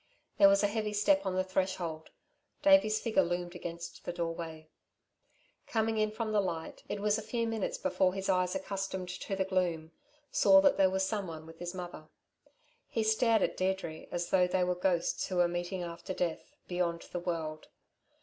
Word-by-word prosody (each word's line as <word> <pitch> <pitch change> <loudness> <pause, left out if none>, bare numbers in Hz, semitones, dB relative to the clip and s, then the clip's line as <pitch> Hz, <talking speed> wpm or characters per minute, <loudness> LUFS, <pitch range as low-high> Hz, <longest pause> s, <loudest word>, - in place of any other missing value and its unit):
There 200 -1 +9
was 200 +1 +4
a - - +5
heavy 210 0 -2
step 200 -1 +3
on 185 - -1
the 185 - +2
threshold. 185 -4 -2 0.5
Davey's 290 -8 +5
figure 220 -4 +2
loomed 175 0 -2
against 170 -1 -7
the - - -3
doorway. 165 -2 -5 1.0
Coming 220 -1 0
in 215 0 +2
from 220 +1 -3
the 210 -1 +3
light, 170 -4 -4
it 205 - -3
was 210 +1 +2
a - - -5
few 230 +2 -2
minutes 225 -3 -2
before 185 -1 +1
his 195 0 -3
eyes 185 -1 +2
accustomed 195 -8 -3
to 195 +2 -4
the 190 0 0
gloom, 175 -4 -1 0.4
saw 290 - +6
that 285 -1 +4
there 190 -1 +5
was 190 0 +1
someone 185 -7 -4
with 165 0 -13
his 175 +1 -5
mother. 175 -4 -7 0.8
He 225 - -1
stared 220 0 +3
at - - 0
Deirdre 185 -4 -2
as 175 0 -3
though 180 -1 +4
they 180 0 +1
were 180 0 +1
ghosts 180 -1 0
who 185 - -4
were 175 -1 +4
meeting 175 +1 -3
after 170 +2 -6
death, 170 -2 -3
beyond 175 -2 -1
the 175 - -2
world. 160 -3 -4
185 Hz, 185 wpm, -31 LUFS, 175-205 Hz, 1.0 s, There